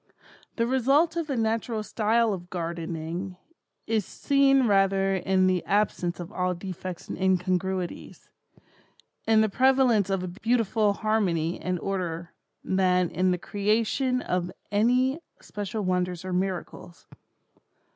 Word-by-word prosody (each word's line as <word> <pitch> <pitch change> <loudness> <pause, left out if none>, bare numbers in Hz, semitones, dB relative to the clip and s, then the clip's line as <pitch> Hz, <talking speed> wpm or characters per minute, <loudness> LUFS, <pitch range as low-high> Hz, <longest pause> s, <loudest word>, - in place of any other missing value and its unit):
The 230 - +1
result 270 +7 +2
of 335 -2 -2
the 275 -4 -2
natural 225 0 -1
style 225 +1 +1
of 175 -2 -7
gardening, 170 +1 -4 0.5
is 220 -1 0
seen 275 - +2
rather 195 -2 +3
in 190 0 +2
the 185 -1 +1
absence 195 -4 0
of 175 - -7
all 180 0 -1
defects 185 0 -7
and - - -5
incongruities—in 190 +3 -3
the 220 - +3
prevalence 255 -4 +3
of 195 -2 -1
a - - -3
beautiful 220 +1 +1
harmony 190 -7 0
and 180 -1 -2
order, 175 -3 -4 0.3
than 180 -2 +2
in 185 +3 +1
the 180 - +1
creation 225 +7 0
of 180 0 -2 0.2
any 250 +7 +2 0.2
special 205 +1 -5
wonders 180 -1 -1
or 185 - -3
miracles. 180 -2 -4
195 Hz, 125 wpm, -26 LUFS, 180-225 Hz, 0.5 s, rather